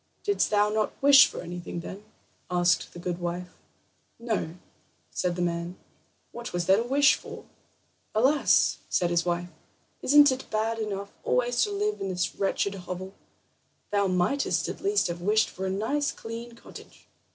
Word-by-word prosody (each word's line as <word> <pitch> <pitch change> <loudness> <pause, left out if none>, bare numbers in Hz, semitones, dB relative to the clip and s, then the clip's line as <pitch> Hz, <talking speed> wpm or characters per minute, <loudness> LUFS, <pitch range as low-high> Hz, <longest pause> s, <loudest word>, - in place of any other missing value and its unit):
"Didst 405 0 +1
thou 210 0 +3
not 215 0 -1
wish 275 -1 +8
for - - -7
anything 175 0 -6
then?" 195 +4 -9 0.5
asked 175 -2 +1
the - - -10
good 175 0 -4
wife. 175 +1 -4 0.6
"No," 220 -8 -3 0.6
said 180 -1 -1
the 175 - -1
man; 170 +1 -3 0.5
"what 240 -3 -7
was 175 -1 -1
there 190 +2 +5
to - - +1
wish 285 +2 +5
for?" - - -8 0.7
"Alas!" 270 +7 +3
said 175 -1 +1
his 170 0 +1
wife; 175 0 -1 0.5
"isn't 290 0 +6
it 260 0 -5
bad 225 +1 -1
enough 200 -2 -4
always 245 -1 +1
to 415 - -5
live 420 +1 -1
in 195 - -2
this 180 -1 -1
wretched 195 0 -1
hovel? 185 0 -7 0.8
Thou 200 -1 +2
mightest 185 +10 0
at - - -6
least 405 +1 +2
have 170 0 -3
wished 215 +4 +2
for 190 +1 -4
a - - -1
nice 250 +10 -1
clean 230 +1 -8
cottage. - - -14
200 Hz, 165 wpm, -27 LUFS, 180-240 Hz, 0.8 s, wish